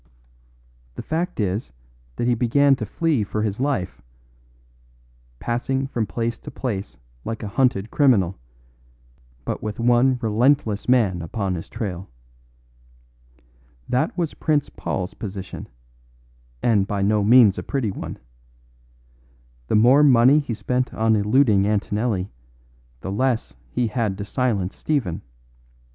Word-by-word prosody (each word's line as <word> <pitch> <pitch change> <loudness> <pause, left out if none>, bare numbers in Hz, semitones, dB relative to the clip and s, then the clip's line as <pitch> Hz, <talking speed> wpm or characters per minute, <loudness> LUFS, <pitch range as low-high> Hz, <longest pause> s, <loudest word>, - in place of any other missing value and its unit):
The - - -6
fact 170 +1 -3
is 100 - -1 0.4
that - - -2
he 125 - +3
began 135 +4 +3
to 110 - -5
flee 155 - 0
for 105 +1 -3
his 105 0 -2
life, 135 -9 -2 1.4
passing 130 - -1
from 115 -5 -2
place 115 +2 -3
to - - -9
place 105 -6 -4 0.3
like 115 0 -5
a - - -3
hunted 110 -2 0
criminal; 105 - +3 1.1
but - - -3
with 105 0 -5
one 120 +2 +3
relentless 115 0 +1
man 105 -9 +3
upon 95 +3 -3
his 85 -2 -6
trail. 95 -4 -5 1.8
That 155 +8 0
was 170 -4 -1
Prince 150 -2 0
Paul's 90 0 -4
position, 95 -3 -7 0.9
and 105 -5 +3
by 100 -2 -1
no 105 +1 +2
means 110 -2 +6
a - - -3
pretty 130 -7 -2
one. - - -7 1.5
The - - +1
more 125 +7 +6
money 135 0 +6
he 135 -6 -3
spent 125 +3 -1
on 110 0 +2
eluding 105 -1 +3
Antonelli 105 -1 -1 0.7
the 95 - -5
less 125 +3 -1
he 125 - -1
had 110 -3 -1
to 100 - -5
silence 105 -5 -1
Stephen. 105 - -2
115 Hz, 125 wpm, -22 LUFS, 100-130 Hz, 1.8 s, means